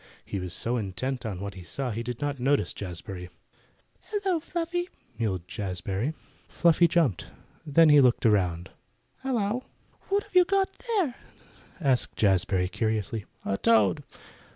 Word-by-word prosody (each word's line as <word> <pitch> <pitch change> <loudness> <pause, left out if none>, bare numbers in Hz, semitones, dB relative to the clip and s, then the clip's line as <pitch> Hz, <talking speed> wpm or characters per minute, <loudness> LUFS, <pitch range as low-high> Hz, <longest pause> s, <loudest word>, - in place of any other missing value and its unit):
He 100 - -3
was 90 -1 -5
so 120 +7 0
intent 120 +5 -3
on 95 -4 -5
what 100 0 -4
he 95 - -10
saw 130 +9 -4
that 110 - -4
he 115 - -2
did 120 0 -5
not 145 -2 -2
notice 140 +3 +2
Jazbury. 90 -1 -7 0.8
"Hello, 390 -5 0
Fluffy!" 345 +2 -3 0.3
mewed 95 -6 -1
Jazbury. 95 - -3 0.3
Fluffy 170 0 +4
jumped. 155 - +1 0.4
Then 160 +2 +6
he 150 -1 +8
looked 125 -1 +3
around. 90 -5 +2 0.5
"Hello!" 245 -2 -1 0.4
"What 400 +1 +1
you 365 -1 +7
got 390 +1 +1 0.2
there?" 390 - +1 0.7
asked 135 -7 +1
Jazbury 95 -2 +2
curiously. 110 +1 -2 0.2
"A 100 - 0
toad." 105 -6 +3
120 Hz, 140 wpm, -27 LUFS, -, 0.8 s, he